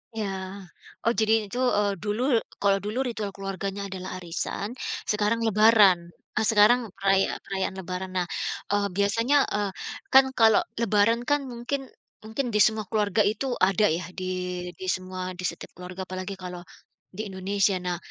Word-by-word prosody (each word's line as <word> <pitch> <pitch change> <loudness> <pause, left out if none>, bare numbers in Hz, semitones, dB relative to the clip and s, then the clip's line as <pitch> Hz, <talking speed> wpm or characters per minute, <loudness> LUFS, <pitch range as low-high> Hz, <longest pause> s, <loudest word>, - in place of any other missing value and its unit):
Iya. 215 -2 -2 0.8
Oh, 235 - +4
jadi 220 -1 +3
itu, 245 - -6 0.2
eee, 205 -1 +2
dulu 210 +3 -1 0.4
kalau 200 -1 +4
dulu 215 +5 -3
ritual 215 -4 -3
keluarganya 195 0 -4
adalah 185 -1 -6
arisan 175 +4 -4 0.4
sekarang 210 +2 +1
Lebaran 215 -4 +6 0.4
eh, 215 - +2
sekarang 215 +4 +6 0.2
peraya 195 -1 +2
perayaan 190 -1 -3
Lebaran. 185 +1 -5
Nah, 175 -1 0 0.4
eee, 205 0 +2
biasanya, 230 +7 +2 0.2
eee, 205 -2 0 0.4
kan 265 0 +9
kalau 220 -1 +7 0.2
Lebaran 230 +1 +3
kan 290 - +4
mungkin 255 +3 -4 0.4
mungkin 220 +5 -3
di 210 - +2
semua 215 0 +3
keluarga 210 -1 +2
itu 220 +5 -4 0.2
ada 205 +2 +3
ya 180 - -5 0.2
di 185 - -4 0.5
di 190 - -6
semua 185 0 -5
di - - -5
setiap - - -7
keluarga 180 +1 -7
apalagi 185 +1 -5
kalau 180 -1 -6 0.5
di 215 - -3
Indonesia. 195 +1 +1
Nah, 180 -1 -2
205 Hz, 150 wpm, -26 LUFS, 190-220 Hz, 0.8 s, kan